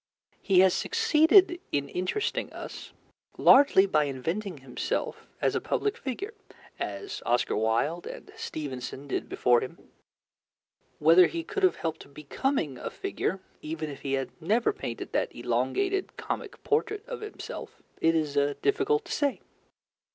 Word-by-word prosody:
He 185 Hz, -2 st, +5 dB
has 190 Hz, -1 st, +5 dB
succeeded 370 Hz, -4 st, +4 dB
in 140 Hz, -1 st, 0 dB
interesting 185 Hz, -, -2 dB
us -, -, -8 dB, 0.5 s
largely 265 Hz, -8 st, +7 dB
by 155 Hz, -6 st, +2 dB
inventing 165 Hz, +8 st, -3 dB
himself 135 Hz, -2 st, -3 dB
as -, -, +1 dB
a -, -, 0 dB
public 415 Hz, -1 st, -1 dB
figure, 385 Hz, -, -5 dB, 0.5 s
as 400 Hz, -, -5 dB
Oscar 120 Hz, 0 st, +1 dB
Wilde 115 Hz, +10 st, 0 dB
and -, -, -9 dB
Stevenson 140 Hz, -1 st, -6 dB
did -, -, -3 dB
before 120 Hz, -1 st, +3 dB
him. 130 Hz, -, -6 dB, 1.2 s
Whether 165 Hz, +4 st, +7 dB
he 335 Hz, -1 st, -4 dB
could 400 Hz, +3 st, -4 dB
have 370 Hz, -1 st, +4 dB
helped 155 Hz, -3 st, -5 dB
becoming 150 Hz, -, -2 dB
a -, -, -4 dB
figure, 385 Hz, -, -3 dB, 0.2 s
even 155 Hz, 0 st, -4 dB
if 140 Hz, -, -10 dB
he 135 Hz, -1 st, -2 dB
had 135 Hz, -1 st, -1 dB
never 225 Hz, -, +2 dB
painted -, -, -6 dB
that -, -, -1 dB
elongated 390 Hz, -1 st, -1 dB
comic -, -, -5 dB
portrait 430 Hz, -1 st, 0 dB
of -, -, -6 dB
himself, 425 Hz, 0 st, -8 dB, 0.2 s
it 165 Hz, 0 st, +4 dB
is 155 Hz, -3 st, 0 dB, 0.3 s
difficult 415 Hz, +1 st, +2 dB
to -, -, -9 dB
say. 285 Hz, -2 st, 0 dB
185 Hz, 140 wpm, -28 LUFS, -, 1.2 s, largely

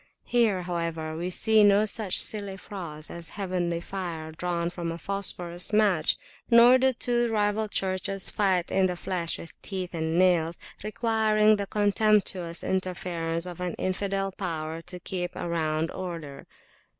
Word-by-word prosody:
Here, 220 Hz, -7 st, +2 dB
however, 165 Hz, -2 st, -3 dB
we 175 Hz, +3 st, -3 dB
see 215 Hz, +3 st, +4 dB
no 205 Hz, +1 st, +5 dB
such 210 Hz, -2 st, 0 dB
silly 200 Hz, -2 st, -1 dB
frauds 170 Hz, -7 st, -6 dB
as 170 Hz, -2 st, -6 dB
heavenly 180 Hz, -4 st, -2 dB
fire 170 Hz, -4 st, -5 dB
drawn 170 Hz, +1 st, -2 dB
from 170 Hz, -2 st, -4 dB
a 165 Hz, -, -5 dB
phosphor 180 Hz, -2 st, -2 dB, 0.2 s
match; 200 Hz, -7 st, +4 dB, 0.3 s
nor 240 Hz, +2 st, +8 dB
do 265 Hz, +1 st, +4 dB
two 240 Hz, -1 st, 0 dB
rival 210 Hz, 0 st, +1 dB
churches 190 Hz, -1 st, -2 dB
fight 190 Hz, -4 st, +1 dB
in 190 Hz, -1 st, +3 dB
the 180 Hz, -, -2 dB
flesh 175 Hz, -1 st, -2 dB
with 165 Hz, -, -10 dB
teeth 185 Hz, -3 st, -5 dB
and 160 Hz, 0 st, -1 dB
nails, 175 Hz, -2 st, +3 dB, 0.3 s
requiring 215 Hz, -1 st, +3 dB
the 200 Hz, -1 st, -3 dB
contemptuous 205 Hz, -4 st, +2 dB
interference 175 Hz, -3 st, -2 dB
of 180 Hz, -1 st, -8 dB
an 180 Hz, -2 st, -3 dB
infidel 195 Hz, +1 st, -1 dB
power 165 Hz, -4 st, -4 dB
to 180 Hz, +1 st, -7 dB
keep 175 Hz, 0 st, -4 dB
around 160 Hz, -1 st, -1 dB
order. 165 Hz, -7 st, -7 dB
185 Hz, 145 wpm, -27 LUFS, 170-205 Hz, 0.3 s, nor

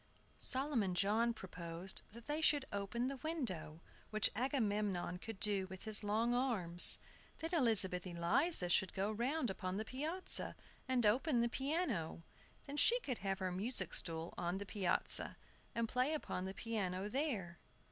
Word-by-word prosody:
Solomon 255 Hz, -9 st, 0 dB
John 215 Hz, +5 st, +2 dB
proposed 180 Hz, -3 st, -5 dB
that 230 Hz, +1 st, -12 dB
they 300 Hz, +2 st, -2 dB
should 290 Hz, -3 st, +4 dB
open 205 Hz, +5 st, -2 dB
the 275 Hz, 0 st, -3 dB
window, 225 Hz, -, -4 dB, 0.3 s
which 215 Hz, 0 st, +3 dB
Agamemnon 210 Hz, -8 st, -1 dB
could 225 Hz, 0 st, -8 dB
do 200 Hz, -3 st, +2 dB
with 190 Hz, 0 st, -9 dB
his 215 Hz, -1 st, +3 dB
long 220 Hz, +4 st, +1 dB
arms. 205 Hz, -9 st, +4 dB, 0.4 s
Then 325 Hz, +2 st, -4 dB
Elizabeth 200 Hz, -, +5 dB
Eliza 180 Hz, -, +2 dB
should 185 Hz, +1 st, +3 dB
go 200 Hz, +2 st, 0 dB
round 245 Hz, +3 st, -1 dB
upon 185 Hz, 0 st, -4 dB
the 215 Hz, -, -3 dB
piazza, 310 Hz, +10 st, 0 dB, 0.3 s
and 255 Hz, -3 st, +2 dB
open 245 Hz, +4 st, +3 dB
the 235 Hz, -, +1 dB
piano. 265 Hz, -, -2 dB, 0.4 s
Then 285 Hz, +1 st, -6 dB
she 475 Hz, +11 st, +5 dB
could 255 Hz, -, -3 dB
have 195 Hz, -1 st, -2 dB
her 185 Hz, -1 st, -2 dB
music 210 Hz, +8 st, 0 dB
stool 165 Hz, 0 st, -2 dB
on 175 Hz, +2 st, -1 dB
the 200 Hz, -, -5 dB
piazza, 195 Hz, -3 st, +1 dB, 0.4 s
and 230 Hz, 0 st, 0 dB
play 255 Hz, +7 st, +1 dB
upon 185 Hz, -10 st, -4 dB
the 190 Hz, +1 st, -5 dB
piano 200 Hz, -4 st, -3 dB
there. 210 Hz, -, -2 dB
215 Hz, 155 wpm, -37 LUFS, 185-260 Hz, 0.4 s, Elizabeth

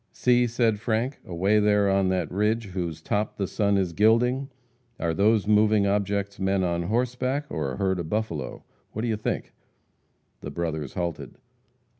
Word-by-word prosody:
"See," 125 Hz, -1 st, +3 dB
said 115 Hz, -2 st, +1 dB
Frank, 115 Hz, +4 st, -1 dB
"away 95 Hz, +5 st, +2 dB
there 105 Hz, -1 st, +3 dB
on 95 Hz, -1 st, +2 dB
that 90 Hz, -4 st, -1 dB
ridge 105 Hz, +2 st, 0 dB
whose 90 Hz, -4 st, -4 dB
top 105 Hz, +1 st, -1 dB
the 100 Hz, -, 0 dB
sun 100 Hz, +1 st, +1 dB
is 90 Hz, -3 st, 0 dB
gilding! 125 Hz, +7 st, +3 dB, 0.5 s
Are 85 Hz, -1 st, 0 dB
those 105 Hz, +3 st, +3 dB
moving 105 Hz, 0 st, +4 dB
objects 100 Hz, 0 st, -1 dB
men 95 Hz, 0 st, +1 dB
on 85 Hz, -1 st, 0 dB
horseback, 125 Hz, +8 st, -1 dB
or 70 Hz, -4 st, -2 dB
a -, -, -6 dB
herd 95 Hz, -1 st, 0 dB
of 80 Hz, -2 st, -5 dB
buffalo? 95 Hz, -10 st, -3 dB, 0.3 s
What 110 Hz, -, -3 dB
do -, -, 0 dB
you 110 Hz, -, +1 dB
think?" 105 Hz, -, -3 dB, 0.9 s
The -, -, -7 dB
brothers 80 Hz, -5 st, -4 dB
halted. 85 Hz, -2 st, -4 dB
100 Hz, 165 wpm, -26 LUFS, 90-110 Hz, 0.9 s, moving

